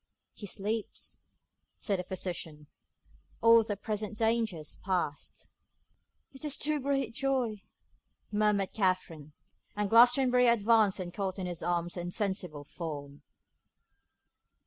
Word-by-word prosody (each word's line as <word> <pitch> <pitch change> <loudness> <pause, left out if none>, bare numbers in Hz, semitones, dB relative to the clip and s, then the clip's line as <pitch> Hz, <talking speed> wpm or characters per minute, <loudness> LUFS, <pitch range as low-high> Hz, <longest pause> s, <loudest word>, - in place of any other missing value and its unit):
'He 205 - -9
sleeps,' 210 +3 -4 0.6
said 200 -3 -1
the - - -2
physician; 170 -5 -4 0.7
'all 230 0 +7 0.2
present 210 -1 -3
danger 225 -4 +1
is 155 -1 -6
past.' 180 -6 -3 0.8
'It 270 - -9
is 295 -2 0
too 300 0 0
great 275 -4 -1
joy,' 255 -5 -1 0.7
murmured 210 -2 +1
Katherine; 185 -7 -1 0.4
and 205 -1 -1
Glastonbury 250 +1 +6
advanced 220 -3 +4
and 175 -1 -5
caught 195 -2 -3
in 190 - -3
his 175 -2 -4
arms 175 0 -1
her 175 - -4
insensible 180 -4 -2
form. 145 -2 -7
200 Hz, 115 wpm, -30 LUFS, 175-230 Hz, 0.8 s, all